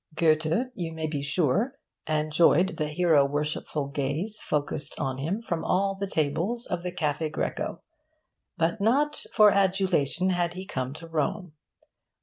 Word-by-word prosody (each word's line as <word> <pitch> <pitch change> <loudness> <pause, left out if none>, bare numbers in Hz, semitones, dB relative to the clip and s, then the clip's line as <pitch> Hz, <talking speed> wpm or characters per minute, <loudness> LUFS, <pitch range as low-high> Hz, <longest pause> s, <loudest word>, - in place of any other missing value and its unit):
Goethe, 160 +10 +2
you 170 -6 -4
may 160 0 -3
be 150 -2 -2
sure, 175 - +1 0.3
enjoyed 155 +3 +3
the 155 - 0
hero 155 -2 +4
worshipful 145 0 -2
gaze 150 +10 -2
focussed 145 0 -2
on 135 -2 -2
him 185 +11 -2
from 170 -6 -2
all 195 +1 +1
the 200 0 -4
tables 170 +11 -1
of 170 - -3
the 180 0 -4
Caffe' 155 -2 -1
Greco. - - -3 0.7
But 170 +6 0
not 285 +8 +2
for 215 -2 +7
adulation 185 -3 +2
had 175 -1 0
he 185 +1 -6
come 130 -6 -3
to 165 +2 -10
Rome. 165 +2 -2
165 Hz, 145 wpm, -27 LUFS, 150-190 Hz, 0.7 s, for